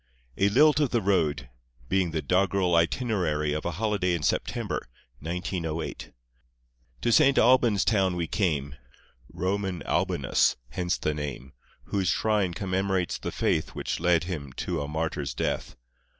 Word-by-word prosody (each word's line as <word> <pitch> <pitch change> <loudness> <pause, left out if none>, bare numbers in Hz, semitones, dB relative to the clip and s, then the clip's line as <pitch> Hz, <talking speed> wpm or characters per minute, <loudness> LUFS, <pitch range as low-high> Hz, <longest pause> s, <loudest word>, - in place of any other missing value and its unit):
A 100 - +3
LILT 150 +6 +5
OF 145 -4 +2
THE 120 - +1
ROAD 80 - +1 0.4
Being 95 -2 +1
the 80 -1 -3
doggerel 95 -1 +2
Itinerary 85 -4 +1
of 75 - -3
a 85 - -1
Holiday 100 -5 +1
in 80 - -4
September, - - -1 0.3
1908 85 0 -4 0.9
To 120 - +1
St. 135 +4 +5
Albans' 120 -4 +4
town 95 -5 +2
we 85 -1 -1
came; 75 -7 -1 0.6
Roman 95 0 -2
Albanus - - +1
hence 90 +7 -1
the 75 - -1
name. 70 -3 -6 0.3
Whose 95 -2 -1
shrine 105 -3 +1
commemorates 95 0 -1
the - - -4
faith - - -1
Which - - -3
led 85 0 +3
him 75 -7 -5
to - - -3
a 70 - -4
martyr's 75 -2 -3
death. - - -2
90 Hz, 140 wpm, -27 LUFS, 80-100 Hz, 0.9 s, LILT